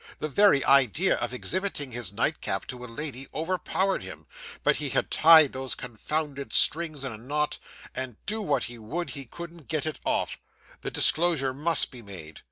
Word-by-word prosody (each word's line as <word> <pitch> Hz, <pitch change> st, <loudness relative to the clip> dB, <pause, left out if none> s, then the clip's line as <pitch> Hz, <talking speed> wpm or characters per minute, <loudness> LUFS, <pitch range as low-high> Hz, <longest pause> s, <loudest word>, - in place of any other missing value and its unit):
The -, -, -3 dB
very 190 Hz, -4 st, +4 dB
idea 140 Hz, -, +4 dB
of -, -, -3 dB
exhibiting 150 Hz, +1 st, -2 dB
his 120 Hz, -5 st, -2 dB
nightcap 100 Hz, -, -1 dB
to 125 Hz, -1 st, -7 dB
a -, -, -7 dB
lady 135 Hz, +2 st, -5 dB
overpowered 185 Hz, +4 st, -1 dB
him, -, -, -9 dB, 0.4 s
but -, -, +3 dB
he -, -, -1 dB
had -, -, -1 dB
tied 160 Hz, -3 st, +7 dB
those 130 Hz, 0 st, -3 dB
confounded 140 Hz, +4 st, -4 dB
strings 155 Hz, -3 st, +4 dB
in 130 Hz, -, -3 dB
a 110 Hz, -, -8 dB
knot, 150 Hz, +5 st, -2 dB, 0.3 s
and, 130 Hz, -3 st, -4 dB
do 215 Hz, +2 st, -2 dB
what 145 Hz, -, 0 dB
he 120 Hz, 0 st, -6 dB
would, 145 Hz, +8 st, -5 dB
he 135 Hz, +1 st, -6 dB
couldn't 170 Hz, +3 st, -10 dB
get 155 Hz, -2 st, -2 dB
it 155 Hz, -, -4 dB
off. -, -, -1 dB, 0.4 s
The -, -, -4 dB
disclosure 155 Hz, -6 st, +3 dB
must 155 Hz, +4 st, +1 dB
be 125 Hz, -, -10 dB
made. 90 Hz, -7 st, -8 dB
140 Hz, 175 wpm, -26 LUFS, 125-165 Hz, 0.4 s, tied